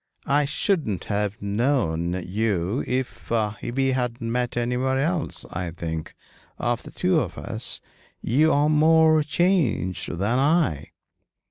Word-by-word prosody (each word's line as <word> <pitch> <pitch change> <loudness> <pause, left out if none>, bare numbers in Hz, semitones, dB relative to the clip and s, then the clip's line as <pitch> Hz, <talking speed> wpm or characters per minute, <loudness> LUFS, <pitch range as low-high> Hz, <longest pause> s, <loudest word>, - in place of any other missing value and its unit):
'I 145 +1 +3
shouldn't 145 - 0
have 105 +1 -2
known 100 - 0
you 100 +1 -1
if 130 0 -3
we 115 +4 0
had 125 -2 -1
met 120 +1 -2
anywhere 125 +2 0
else. 155 +3 -1
I 90 0 -3
think, 80 -1 -5 0.4
of - - -1
the - - -11
two - - +1
of - - -4
us, - - -5 0.4
you 150 +7 +3
are 145 +1 +3
more 155 +1 +5
changed 150 - +1
than 105 +7 +1
I.' 140 - +2
125 Hz, 125 wpm, -24 LUFS, 100-145 Hz, 0.4 s, more